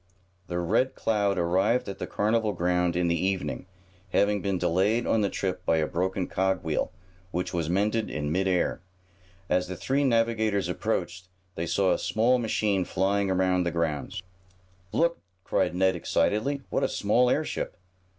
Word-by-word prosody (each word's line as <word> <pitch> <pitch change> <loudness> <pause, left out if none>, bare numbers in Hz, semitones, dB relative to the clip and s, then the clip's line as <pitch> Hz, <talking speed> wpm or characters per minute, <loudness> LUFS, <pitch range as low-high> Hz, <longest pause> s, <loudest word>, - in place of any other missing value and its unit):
The 90 - -3
Red 90 +10 +1
Cloud 100 -3 +1
arrived 95 +8 +2
at 100 - -6
the - - -4
carnival 110 0 +1
grounds 90 0 +1
in 90 -1 +2
the 85 0 0
evening, 90 -7 -2 0.4
having 100 +2 +2
been 100 -2 0
delayed 100 +8 +1
on 110 - +2
the 100 - +1
trip 90 -2 -3
by 80 - +2
a 80 - +2
broken 90 +3 -1
cog 95 0 0
wheel, 80 -2 -1 0.4
which 90 0 -3
was 85 -2 -1
mended 105 +4 +1
in 75 -1 -3
mid 95 +3 +1
air. 90 -2 0 0.7
As 90 0 +1
the 95 - -5
three 135 +9 0
navigators 115 - +1
approached, 90 -1 -2 0.3
they 85 0 -3
saw 95 +2 +2
a - - -1
small 120 +3 +2
machine 105 -4 +1
flying 100 +2 0
around 95 -1 +2
the 85 - 0
grounds. 85 0 -2 0.7
"Look!" 170 0 +1 0.2
cried - - 0
Ned 95 0 +3
excitedly. 115 - 0
"What - - +1
a - - +2
small 120 +5 +2
airship." 155 +4 -1
95 Hz, 165 wpm, -27 LUFS, 90-110 Hz, 0.7 s, Ned